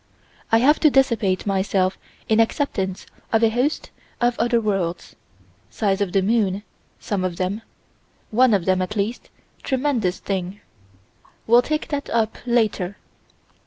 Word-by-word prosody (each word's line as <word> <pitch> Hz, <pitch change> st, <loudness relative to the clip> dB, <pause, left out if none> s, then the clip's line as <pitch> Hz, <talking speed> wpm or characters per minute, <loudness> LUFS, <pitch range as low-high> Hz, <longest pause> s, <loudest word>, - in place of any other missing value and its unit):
I 225 Hz, -, +6 dB
have 280 Hz, +6 st, +4 dB
to 310 Hz, -, +5 dB
dissipate 230 Hz, -9 st, +2 dB
myself 190 Hz, -1 st, 0 dB, 0.3 s
in 220 Hz, 0 st, +3 dB
acceptance 200 Hz, -5 st, 0 dB, 0.3 s
of 225 Hz, 0 st, +3 dB
a 225 Hz, -, +4 dB
host 255 Hz, +6 st, -1 dB, 0.3 s
of 240 Hz, 0 st, +2 dB
other 235 Hz, +1 st, +2 dB
worlds: 195 Hz, -6 st, -2 dB, 0.5 s
size 200 Hz, -2 st, -1 dB
of 195 Hz, -3 st, 0 dB
the 195 Hz, 0 st, +2 dB
moon, 205 Hz, -2 st, +1 dB, 0.4 s
some 200 Hz, -3 st, -2 dB
of 180 Hz, -2 st, -2 dB
them: 190 Hz, +4 st, -2 dB, 0.7 s
one 240 Hz, 0 st, +4 dB
of 185 Hz, -4 st, -1 dB
them, 185 Hz, -1 st, +2 dB
at 185 Hz, +4 st, -3 dB
least 215 Hz, +4 st, -3 dB, 0.3 s
tremendous 255 Hz, -9 st, 0 dB
thing: 190 Hz, 0 st, -4 dB, 0.9 s
we'll 235 Hz, +2 st, +6 dB
take 305 Hz, +4 st, -3 dB
that 285 Hz, -1 st, -3 dB
up 225 Hz, -1 st, 0 dB
later. 210 Hz, -5 st, 0 dB
215 Hz, 140 wpm, -22 LUFS, 190-240 Hz, 0.9 s, I